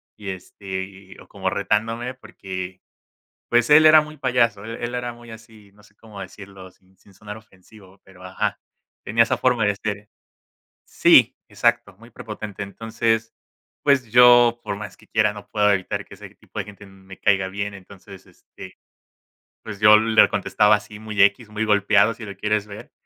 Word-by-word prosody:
Y 105 -2 -8
este, 95 0 -7
y 95 0 -14
o - - -16
como - - -4
retándome, 115 +5 -2
porque, 95 -7 -9 0.7
pues 120 0 +2
él 155 +1 +7
era 155 0 +8
muy 155 0 -11
payaso, 120 -6 0
él 115 +1 -7
él 120 +1 -4
era 120 -1 -4
muy 120 -1 -14
así, 110 -2 -15
no 105 - -22
sé, 105 0 -24
cómo 105 -2 -14
decirlo, 95 0 -12
sin 95 +1 -31
sin 100 - -23
sonar 105 +2 -10
ofensivo, 100 -2 -20
pero, 95 -1 -18
ajá, 95 0 -3 0.4
tenía 115 +3 +3
esa 115 - -1
forma 125 -4 +1
de 105 0 +1
ser. 105 -1 -5 0.8
Sí, - - +4
exacto, - - -1
muy 115 +4 -17
prepotente, 105 -3 -8
entonces, 115 +2 -2 0.5
pues 130 -5 +2
yo, 120 0 +6
por 100 - -4
más 105 0 -9
que - - -22
quiera, 110 -2 +1
no 105 -1 -12
puedo 105 -1 +2
evitar 95 -2 -3
que - - -14
ese - - -12
tipo - - -13
de 100 - -2
gente 105 0 -13
m 95 -1 -18
me 95 0 -13
caiga 95 -1 +1
bien, 100 +2 -5
entonces, 95 0 -14
este, - - -15 0.9
pues 100 -2 -9
yo 105 0 +7
le 110 0 +4
contestaba 105 0 +2
así 105 0 -11
muy 110 -1 -5
equis, 105 +3 +2
muy 105 +1 -3
golpeado, 105 +1 +3
si 115 -1 -10
lo 100 -2 -9
quieres 105 0 -1
ver, 105 0 -12
105 Hz, 180 wpm, -22 LUFS, 100-115 Hz, 0.9 s, era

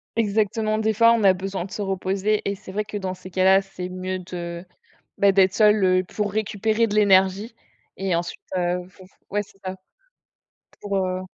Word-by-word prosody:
Exactement, 215 0 0
des 220 0 +1
fois 230 +2 +5
on 225 -3 +1
a 190 -1 +6
besoin 190 -1 -4
de 200 - -12
se 210 - -5
reposer 195 +2 -1
et 200 - 0
c'est 190 -1 -11
vrai 210 +2 -2
que 210 - -5
dans 185 -1 -4
ces 185 0 -12
cas-là, 190 +1 +4
c'est 185 -1 -7
mieux 185 0 -4
de 175 -1 -6 0.6
bah, 200 -1 +5
d'être 190 -1 +4
seul, 210 -2 +4
heu, 185 0 +3
pour 205 +2 -3
récupérer 215 +1 0
de 210 - -4
l'énergie, 200 +2 +3 0.4
et 190 -3 0
ensuite, 175 0 -4 0.2
heu, 180 0 -1
faut 190 0 -17
f - - -25 0.2
ouais, 205 0 0
c'est 200 -1 -20
ça. 185 0 -5 1.1
Pour, 200 -1 -3
heu 185 0 -2
195 Hz, 195 wpm, -23 LUFS, 185-210 Hz, 1.1 s, a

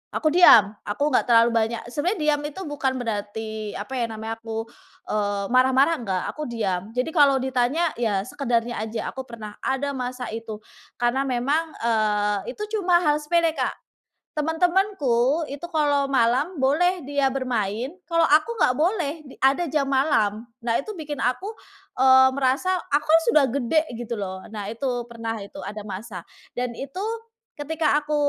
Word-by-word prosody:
aku 310 - +1
diam, 230 - +8 0.2
aku 205 +7 -2
nggak 255 - +3
terlalu 230 0 +6
banyak 225 0 0
sebenarnya 350 - -1 0.2
diam - - -6
itu 305 +6 -8
bukan 280 -3 -1
berarti, 215 -2 -4
apa 210 +6 -7
ya 235 - +1
namanya, 220 +1 -5
aku, 225 0 -4 0.5
eee, 205 -1 -1
marah-marah 260 +5 +4
enggak, 190 -6 -2
aku 305 - -6
diam. 200 -4 -2
Jadi 250 +4 0
kalau 280 -3 +5
ditanya 265 +6 +1
ya 210 -5 +1
sekedarnya 240 -3 -1
aja, 220 0 -4
aku 265 - -6
pernah 220 -3 -9
ada 270 +2 -1
masa 250 -2 -4
itu, 225 -2 -6 0.4
karena 240 +3 +2
memang, 280 +6 0
eee, 210 -2 0
itu - - -10 0.2
cuma 355 -2 +3
hal 295 -2 +3
sepele 330 +2 +2
Kak, - - 0 0.6
teman-temanku 320 - +1
itu 285 +4 -6
kalau 290 -3 +1
malam 260 +7 +2
boleh 340 +7 +2
dia 285 -1 +1
bermain, 245 -2 -2 0.2
kalau 335 -1 +2
aku 310 +11 +3
nggak 250 - +3
boleh 340 -3 +1
d 270 - -13
ada 275 +6 +3
jam 295 0 +1
malam. 245 -6 +1 0.2
Nah 230 -1 0
itu 430 - -5
bikin 300 -4 -6
aku, 310 - -1 0.5
eee, 260 0 +7
merasa 275 +7 +1 0.2
aku 290 +1 +2
kan 325 +1 +6
sudah 300 -10 +5
gede 280 +4 +2 0.2
gitu 235 -1 -4
loh, 190 -1 -5
nah 205 -2 -5
itu 245 +1 -2
pernah 230 -1 -4
itu 200 - -11
ada 210 +1 -6
masa 190 -2 -7 0.3
dan 250 0 -2
itu 275 +8 -7 0.6
ketika 300 0 +1
aku, 300 0 -2
260 Hz, 160 wpm, -24 LUFS, 225-295 Hz, 0.6 s, diam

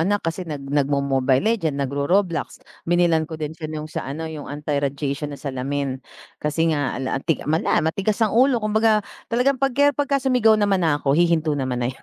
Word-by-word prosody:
anak 205 +5 +2
kasi 165 +3 -2
nag 150 -5 -6
nagmo 140 0 +1
Mobile 135 -1 +2 0.2
Legend, 160 -10 -2
nagro 140 +1 -1
Roblox, 180 -6 0 0.2
binilhan 170 -2 +2
ko 160 - -6
din 155 0 -4
siya 155 -1 -7
nung 155 -1 -5
sa 155 - -5
ano 160 +3 -4
yung 155 -3 -7
anti-radiation 145 0 -2
na 140 - -8
salamin. 135 0 -3 0.4
Kasi 155 +2 +1
nga 145 -4 -2
ala 130 -1 -2
ang - - -18
ti 165 - 0
matigas 165 +6 +1
ang 215 -2 +1
ulo 255 +1 +4
kumbaga 215 0 +2 0.2
talagang 255 +3 +2
pagke 285 +2 +3
pagka-sumigaw 260 -6 +2
naman 200 -3 +2
na 150 -3 +2
ako 140 -1 +1
hihinto 165 -2 +2
naman 130 -3 -2
na - - -1
'yun. - - -21
160 Hz, 190 wpm, -22 LUFS, 140-205 Hz, 0.4 s, ulo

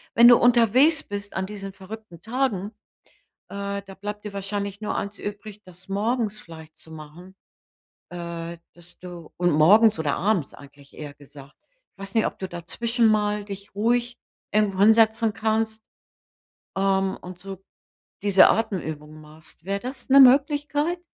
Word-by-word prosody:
wenn 235 +1 +8
du 240 -1 +8
unterwegs 245 +6 +4
bist 205 0 -7
an 190 0 -1
diesen 195 -1 -7
verrückten 195 -3 -11
Tagen, 220 -4 -2 0.8
äh, 200 0 -4
da 195 -1 -12
bleibt 210 +1 -7
dir 205 - -6
wahrscheinlich 200 +1 -4
nur 210 - -3
eins 200 0 -5
übrig, 205 0 -8
das 185 +1 -14
morgens 215 +1 -1
vielleicht 160 -1 -13
zu 160 - -13
machen, 160 +5 -12 0.7
äh, 170 -1 -7 0.2
dass 175 0 -14
du 175 -3 -11
und 175 0 +2
morgens 200 +8 +5
oder 145 -3 0
abends 190 -7 0
eigentlich 140 0 -16
eher 145 -2 -9
gesagt. 140 0 -15 0.4
Ich - - -47
weiß 195 0 -9
nicht, 225 - +3
ob - - -7
du 190 - -4
dazwischen 225 +8 -1
mal 210 -1 +1
dich 200 -1 -9
ruhig 240 +3 0 0.3
irgendwo 205 -3 +1
hinsetzen 220 +1 +4
kannst, 220 0 -1 0.9
ähm, 195 0 +1
und 180 0 -11
so 195 0 -9 0.6
diese 195 -2 +6
Atemübungen 155 -8 -3
machst. 155 +1 -16
Wäre 200 +1 -2
das 255 +3 -8
'ne 275 +1 +7
Möglichkeit? 290 +5 +4
200 Hz, 150 wpm, -24 LUFS, 175-220 Hz, 0.9 s, wenn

